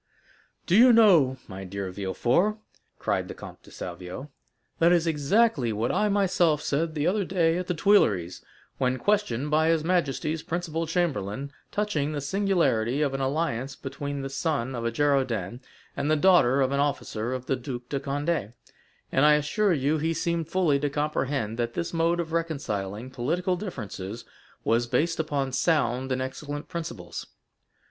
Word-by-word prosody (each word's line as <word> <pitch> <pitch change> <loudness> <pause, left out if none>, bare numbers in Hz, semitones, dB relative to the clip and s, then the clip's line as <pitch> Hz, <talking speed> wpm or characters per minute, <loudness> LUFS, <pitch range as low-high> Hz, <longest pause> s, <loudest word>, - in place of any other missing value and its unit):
"Do 180 - +2
you 245 +4 +8
know, 175 - +5
my 95 -1 -7
dear 95 0 -5
Villefort," 120 - +1 0.4
cried - - -1
the - - -7
Comte - - -11
de - - -17
Salvieux, 90 +10 -7 0.5
"that 170 +1 +5
is 175 -1 +3
exactly 155 - +2
what 110 +3 -1
I 210 - +1
myself 180 -6 +2
said 155 +3 -1
the 150 0 0
other 200 +3 +2
day 175 -2 +1
at 180 - -4
the 180 - -1
Tuileries, 105 - +2 0.4
when 130 -1 +1
questioned 150 - 0
by 155 +1 +3
his 165 -2 +2
majesty's 160 -2 0
principal 165 -1 -3
chamberlain 140 - -1 0.2
touching 155 -8 -1
the 145 - -2
singularity 145 - +1
of 140 -2 0
an 135 - -2
alliance 135 -2 -1
between 140 +1 -5
the 135 - -4
son 135 -4 -1
of 120 -2 -4
a 115 - 0
Girondin 125 -6 0 0.4
and 140 +2 -1
the 155 - +4
daughter 145 -6 +4
of 130 0 +2
an 140 - 0
officer 125 -5 -1
of 130 -1 -4
the 135 - 0
Duc 125 -1 -6
de 140 - -1
Condé; 145 -4 -2 0.6
and 135 - +3
I 150 0 +7
assure 150 +8 +1
you 150 0 +1
he 165 +2 0
seemed 170 -1 -1
fully 165 -5 +2
to 145 +1 0
comprehend 140 -6 -2
that 120 0 -2
this 170 - -3
mode 165 +1 +1
of 165 -2 -3
reconciling 125 -9 -3
political 170 +9 -1
differences 115 - -6 0.4
was 115 +1 +2
based 165 +7 0
upon 140 -4 -1
sound 130 -3 +1
and 130 0 0
excellent 145 +3 -6
principles. 160 - -6
145 Hz, 165 wpm, -26 LUFS, 125-170 Hz, 0.6 s, you